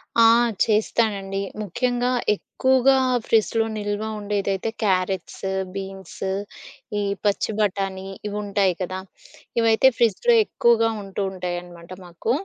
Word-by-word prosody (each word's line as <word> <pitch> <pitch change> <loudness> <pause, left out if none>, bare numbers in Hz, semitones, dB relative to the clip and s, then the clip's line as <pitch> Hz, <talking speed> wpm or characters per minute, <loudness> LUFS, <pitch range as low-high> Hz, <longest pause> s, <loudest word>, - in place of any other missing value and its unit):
ఆ! 230 - +5 0.4
చేస్తానండి. 210 -3 0 0.2
ముఖ్యంగా 245 +5 0 0.2
ఎక్కువగా 260 +4 +2 0.3
ఫ్రిడ్జ్‌లో 225 0 +2
నిల్వ 205 0 -2 0.2
ఉండేదైతే 200 0 -1
క్యారెట్స్, 185 -2 -1 0.3
బీన్స్ 195 -3 -8 0.8
ఈ - - 0 0.2
పచ్చి 205 +1 +1
బఠాణీ 195 -2 -1 0.2
ఇవుంటాయి 200 -2 0
కదా! 185 +1 -3 0.6
ఇవైతే 225 +2 +5
ఫ్రిడ్జ్‌లో 235 - +3
ఎక్కువగా 230 - +3
ఉంటూ 195 0 -5
ఉంటాయనమాట 175 -2 -6 0.2
మాకు. 175 +6 -3
205 Hz, 95 wpm, -23 LUFS, 190-225 Hz, 0.8 s, ఆ